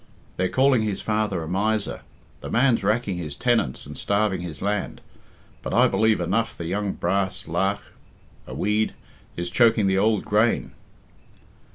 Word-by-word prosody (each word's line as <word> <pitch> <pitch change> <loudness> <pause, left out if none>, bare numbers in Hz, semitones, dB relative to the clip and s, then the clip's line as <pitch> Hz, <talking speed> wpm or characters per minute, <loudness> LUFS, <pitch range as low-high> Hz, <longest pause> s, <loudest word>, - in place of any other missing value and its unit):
They're 95 0 0
calling 130 -2 +3
his 105 -3 -2
father 105 -5 -1
a - - -7
miser. 105 +4 -1 0.4
The - - -7
man's 120 -3 +2
racking 105 -2 0
his 75 -5 -5
tenants 120 - 0
and - - -9
starving 100 -3 0
his 85 -4 -6
land. 100 0 -2 0.6
But - - -3
I - - +6
believe 110 +2 +2
enough 115 0 -1
the 85 - -5
young 100 +3 -2
brass 95 +1 -1
lagh 95 +5 0 0.6
(a - - -7
weed) 105 +1 0 0.4
is 85 0 -3
choking 115 -1 +4
the 95 0 +2
ould 110 0 +2
grain." 110 +3 +1
105 Hz, 155 wpm, -24 LUFS, 95-110 Hz, 0.6 s, I